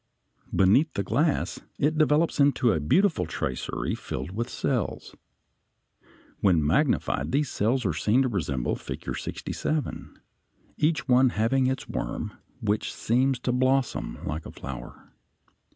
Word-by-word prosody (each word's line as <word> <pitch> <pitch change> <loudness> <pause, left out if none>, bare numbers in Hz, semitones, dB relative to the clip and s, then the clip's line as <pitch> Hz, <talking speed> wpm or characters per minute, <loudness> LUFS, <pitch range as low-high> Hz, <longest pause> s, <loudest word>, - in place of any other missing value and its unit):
Beneath 110 - +4
the 100 - 0
glass 150 - 0 0.2
it 150 +2 +1
develops 155 +1 +2
into 135 -4 +4
a 80 - 0
beautiful 155 - +2
tracery 65 -5 -3
filled 65 +6 -5
with 115 +4 -3
cells. - - -2 1.2
When 85 -6 +3
magnified 130 - +1
these 140 0 +1
cells 120 +4 +1
are 95 - +1
seen 105 - +2
to - - +1
resemble 75 - -1
Figure - - -6
67, 155 -1 -4 0.6
each 150 -2 +1
one 130 0 +5
having 120 +4 +1
its 130 0 -2
worm, - - -4 0.3
which 105 0 0
seems 130 +3 +1
to 125 - 0
blossom 130 +1 +1
like 80 +3 -4
a - - -8
flower. 65 -3 -9
125 Hz, 130 wpm, -26 LUFS, 95-140 Hz, 1.2 s, one